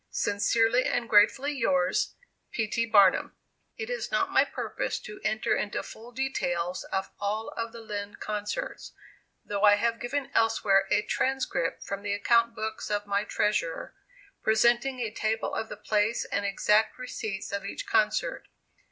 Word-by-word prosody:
Sincerely 225 +4 +2
and 240 -1 0
gratefully, 220 +7 +4
yours, 185 -10 +1 0.3
P. 225 - -1
T. 230 +2 -1
BARNUM. 200 -4 +4 0.4
It 445 - -4
is - - -3
not - - +1
my - - +5
purpose - - -3
to 210 0 -10
enter 215 0 +1
into 205 - -2
full 230 +2 -11
details 180 -9 -2
of 190 0 -3
all 210 +2 -2
of 230 0 -4
the 230 0 -10
Lind 205 -2 -6
concerts, 215 - -4 0.5
though 200 -1 -3
I 205 -1 +7
have 230 +2 0
given 275 +3 -3
elsewhere 215 -4 +3
a - - +3
transcript 265 -10 -1
from 200 0 -5
the 205 0 -2
account 235 +3 +3
books 220 0 -4
of 205 0 -1
my 200 0 0
treasurer, 190 -6 -1 0.5
presenting 240 +4 +3
a 225 -3 -2
table 220 0 -1
of 220 - -3
the - - -7
place 210 +2 0
and 200 - -1
exact 210 +2 +2
receipts 220 -5 -5
of 200 -1 -3
each 200 - -5
concert. 215 0 +1
215 Hz, 155 wpm, -28 LUFS, 205-235 Hz, 0.5 s, I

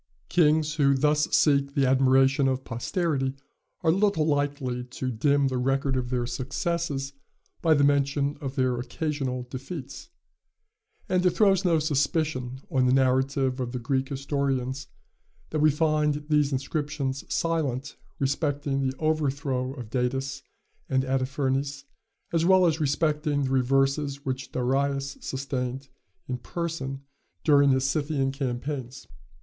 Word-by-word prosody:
Kings 155 -2 +3
who 140 -2 +4
thus 150 +2 +3
seek 140 -2 +3
the 140 - +3
admiration 135 +1 +4
of 130 0 -1
posterity 135 - -1 0.5
are 160 - +3
little 195 -3 +2
likely 145 -4 -1
to 130 +1 -4
dim 140 +4 +2
the 130 -1 -1
record 135 +1 +1
of 125 -1 -2
their 125 -1 0
successes 140 +3 -2 0.5
by 160 -2 +4
the 140 - +3
mention 140 0 +2
of 135 -2 -5
their 130 -3 +1
occasional 130 0 -3
defeats; 140 - -7 1.0
and 180 -1 +1
it 180 - +5
throws 195 0 +3
no 170 -3 +3
suspicion 145 -3 -1
on 130 -1 +3
the 125 - +3
narrative 130 0 +2
of 125 -1 -3
the - - -2
Greek 130 +2 -1
historians 135 -2 -2 0.6
that 155 - -1
we 155 +1 +5
find 150 -1 +1
these 150 -2 +3
inscriptions 140 0 -2
silent 150 -6 -1 0.2
respecting 140 0 -1
the 130 0 -1
overthrow 140 -4 -1
of 120 -5 -8
Datis 135 +2 -1 0.5
and 130 -1 +2
Artaphernes, 135 +1 -1 0.5
as 165 -1 +2
well 185 +1 +5
as 160 -2 +2
respecting 150 0 +1
the 130 - -1
reverses 135 +2 +1
which 130 0 -4
Darius 135 +2 -1
sustained 130 0 -4 0.4
in 125 -1 -3
person 140 -3 -4 0.4
during 145 -2 +5
his 130 -1 +3
Scythian 140 -1 0
campaigns. 135 -1 -4
140 Hz, 135 wpm, -26 LUFS, 130-150 Hz, 1.0 s, it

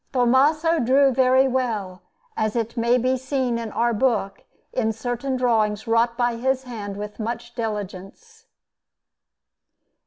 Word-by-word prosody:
Tommaso 290 +6 +3
drew 270 +2 +4
very 260 +1 +4
well, 220 -8 -2 0.3
as 215 0 -1
it 230 0 -2
may 235 +1 +2
be 255 +2 +1
seen 260 -2 -1
in 225 -2 -5
our 235 +2 +1
book, 220 -4 0 0.3
in 225 -3 0
certain 245 +4 -3
drawings 220 -4 +1
wrought 230 +1 +1
by 240 -1 0
his 265 +2 0
hand 210 -5 -7
with 210 +1 -7
much 235 +2 -5
diligence. 220 - -6
240 Hz, 130 wpm, -23 LUFS, 220-260 Hz, 0.3 s, drew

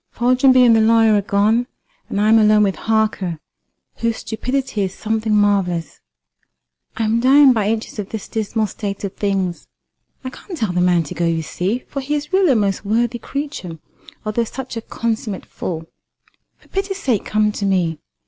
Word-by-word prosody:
Foljambe 255 +1 +4
and 230 -2 +6
the 220 - +4
lawyer 225 0 +4
are 205 - +3
gone, 215 +4 +1 0.4
and 200 - -2
I 210 - +2
am 225 0 +6
alone 215 0 +5
with 195 -2 +1
Harker, 215 -6 -1 0.6
whose 230 -1 -1
stupidity 250 0 -3
is 190 -1 -2
something 220 0 -2
marvellous. 195 -5 +1 1.0
I 225 - 0
am 220 +1 +1
dying 270 +2 +6
by 210 -3 0
inches 220 0 -3
of 200 - -4
this 220 -3 -6
dismal 220 0 -1
state 200 0 -5
of 200 -1 -3
things. 195 -4 -2 0.6
I 255 - -5
can't 355 +6 -9
tell 220 -9 -1
the 180 - +1
man 175 -2 +3
to 145 - -7
go, 170 - -1
you 165 -1 0
see, 195 +10 -3
for 275 - -4
he 290 +3 -2
is 295 +4 -5
really 375 -7 +4
a - - +1
most 200 -3 0
worthy 235 +3 0
creature, 280 - -5 0.5
although 215 +2 0
such 255 +2 -7
a 230 - -3
consummate 225 -3 -3
fool. 165 -2 -5 0.7
For - - -25
pity's 390 0 -2
sake 250 - 0
come 215 0 +1
to 205 - -4
me. 175 -5 0
220 Hz, 185 wpm, -19 LUFS, 200-240 Hz, 1.0 s, and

